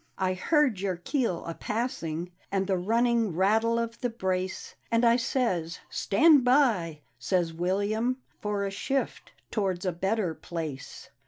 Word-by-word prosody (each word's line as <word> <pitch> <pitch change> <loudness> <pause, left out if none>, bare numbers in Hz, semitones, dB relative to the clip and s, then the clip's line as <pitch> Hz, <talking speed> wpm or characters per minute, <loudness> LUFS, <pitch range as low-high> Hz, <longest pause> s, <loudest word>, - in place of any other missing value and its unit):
I 185 -1 +1
heard 260 - +2
your 190 -1 -1
keel 225 - -1
a 165 - -4
passing 175 -7 -3 0.2
And 195 -1 +1
the 190 0 +1
running 225 +1 +1
rattle 220 +5 +3
of 230 0 -3
the 245 - 0
brace, 190 -4 -3 0.2
And 230 +1 +3
I 235 0 +6
says, 230 -10 -1
" - - -34
Stand 295 +5 +5
by," 225 - +2
' 120 - -42
says 170 +4 0
William, 205 +8 0
' - - -42
" - - -39
For 205 -1 -1
a 195 - -3
shift 270 +7 -2 0.2
towards 190 -4 -1
a 185 - +1
better 190 +1 -1
place." 155 -6 -7
200 Hz, 165 wpm, -28 LUFS, 180-235 Hz, 0.2 s, I